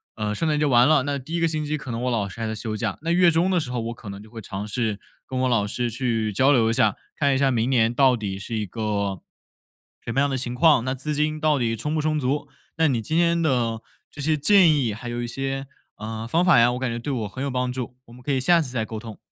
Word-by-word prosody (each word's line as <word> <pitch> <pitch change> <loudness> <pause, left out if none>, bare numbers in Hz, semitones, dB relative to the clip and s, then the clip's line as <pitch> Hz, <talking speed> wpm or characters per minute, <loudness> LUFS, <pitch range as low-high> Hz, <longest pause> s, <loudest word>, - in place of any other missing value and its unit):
呃， 105 -1 -2
圣 160 +10 -1
诞 150 -1 +1
节 150 - +2
完 125 -2 +5
了， 155 -4 +4
那 140 0 -2
第 135 +5 -9
1 - - 0
个 165 - +3
星 155 -1 -2
期 155 +1 -1
可 135 -3 -7
能 115 0 -3
我 125 - 0
老 105 -4 -1
师 95 - -11
还 115 - -2
在 110 - -3
休 110 0 -4
假， 105 -3 -2
那 165 +2 -1
月 180 0 +5
中 170 +3 +2
的 180 - +3
时 150 - -4
候， 125 - -2
我 115 +1 -4
可 120 -2 -13
能 100 +1 -8
就 110 - -15
会 115 0 -9
尝 100 -1 -6
试 105 -1 -2 0.3
跟 130 - -4
我 130 - +2
老 105 -4 +1
师 120 +3 -2
去 115 -2 -1
交 130 +8 +4
流 115 -4 +3
一 115 - +1
下， 110 -2 +2 0.2
看 140 -2 +2
一 - - +2
下 135 0 +2
明 120 0 0
年 120 -3 +3
到 130 0 +4
底 100 -4 -4
是 115 +3 -5
一 105 - -2
个 100 -2 -2 0.8
什 115 - -3
么 135 - +2
样 140 - +2
的 135 - -1
情 125 -1 -4
况， 130 -2 +4
那 130 - 0
资 135 +3 -4
金 155 +1 0
到 150 -2 +2
底 115 -2 0
充 150 +7 -3
不 155 - 0
充 155 0 0
足。 145 +1 -1 0.3
那 160 -1 +3
你 120 -4 0
今 155 +9 -2
天 170 0 +3
的 120 -7 0 0.3
这 145 - -8
些 155 +2 +2
建 175 +2 +5
议 120 -6 0
还 115 +3 -8
有 120 0 -3
一 120 - -3
些， 135 +2 -3 0.3
呃， 110 +1 -5
方 165 +8 +2
法 180 -8 +6
呀， 120 +1 +4
我 125 - -4
感 130 -1 -1
觉 115 - -3
对 145 +4 -4
我 115 -5 -2
很 130 +6 -8
有 140 - -1
帮 125 0 -1
助， 125 -1 -5
我 115 - -16
们 125 - -14
可 140 +3 -2
以 135 - +1
下 170 +6 +4
次 140 - -4
再 120 -3 -2
沟 110 0 -6
通。 110 -2 -9
125 Hz, 315 characters per minute, -24 LUFS, 115-145 Hz, 0.8 s, 法